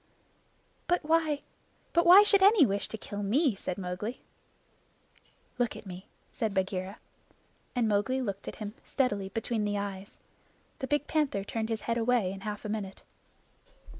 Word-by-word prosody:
"But 355 0 +1
why 315 -2 +2 0.5
but 340 0 +3
why 380 +4 +10
should 405 -2 +5
any 395 -5 +7
wish 200 -2 0
to 220 - -6
kill 205 -1 -6
me?" 250 +7 +2
said 185 -2 -5
Mowgli. 190 +6 -4 1.4
"Look 240 -1 0
at - - -10
me," 185 0 -9 0.2
said 215 -3 -2
Bagheera. 190 +1 -2 0.8
And 240 -2 +2
Mowgli 215 +5 +1
looked 200 -6 -4
at - - -5
him 210 -1 -6
steadily 205 -8 -1
between 225 +1 -2
the 205 0 -1
eyes. 200 -1 -6 0.6
The 265 - -3
big 295 +1 +1
panther 295 -12 0
turned 220 +2 -3
his 225 -2 -2
head 230 0 -1
away 230 -5 +2
in 195 - -8
half 210 0 -5
a - - -2
minute. 205 -3 -5
220 Hz, 160 wpm, -29 LUFS, 200-265 Hz, 1.4 s, why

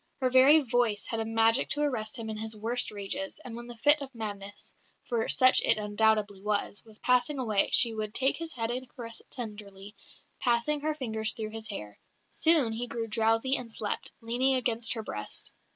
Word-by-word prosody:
Her 255 -2 +1
very 270 +5 +7
voice 240 -5 0
had 225 - -3
a 225 - -1
magic 225 +2 +2
to 295 - -1
arrest 230 -6 -2
him 230 -1 -5
in 220 - -4
his 220 0 -4
worst 230 +4 -1
rages, 215 +8 -5
and 235 -2 -7
when 240 0 -8
the 240 -1 -9
fit 290 +5 +4
of 265 -2 -8
madness 205 -2 -6 0.3
(for 235 -3 -2
such 255 0 +5
it 225 - +3
undoubtedly 210 -1 +1
was) 205 0 -2
was 220 -2 -11
passing 250 +5 +2
away 215 -6 +1
she 235 -2 +4
would 215 0 -4
"take 270 +1 +2
his 330 -1 -6
head 230 -1 -2
and 250 +1 -5
caress 230 -3 -8
it - - -22
tenderly, 210 -4 -8 0.5
passing 245 +4 +1
her 305 +1 -1
fingers 220 -6 -2
through 215 -2 -5
his 220 0 -5
hair. 105 - -7 0.3
Soon 315 -8 +3
he 240 +2 -4
grew 235 -1 -3
drowsy 225 +4 +2
and 240 -4 -5
slept, 215 -2 -4
leaning 245 +4 +1
against 230 -2 0
her 225 - -5
breast. 105 - +3
225 Hz, 200 wpm, -29 LUFS, 215-255 Hz, 0.5 s, very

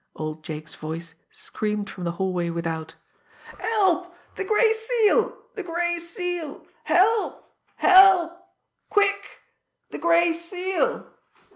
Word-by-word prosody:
Old 155 0 -6
Jake's 155 -1 -7
voice 165 +2 -7 0.2
screamed 210 -1 -4
from 185 -3 -7
the 170 - -2
hallway 180 -1 -2
without: 165 -1 -4 0.6
"Help! 375 -5 +1 0.2
The - - -3
Gray 440 +3 +3
Seal! 445 -1 +1 0.2
The 415 - -5
Gray 345 -1 -2
Seal! 340 -3 -5 0.2
Help! 425 +5 +2 0.3
Help! 370 -3 +6 0.5
Quick! 405 -1 0 0.5
The - - -6
Gray 340 0 +3
Seal!" 370 +7 -2
345 Hz, 110 wpm, -24 LUFS, -, 0.6 s, Help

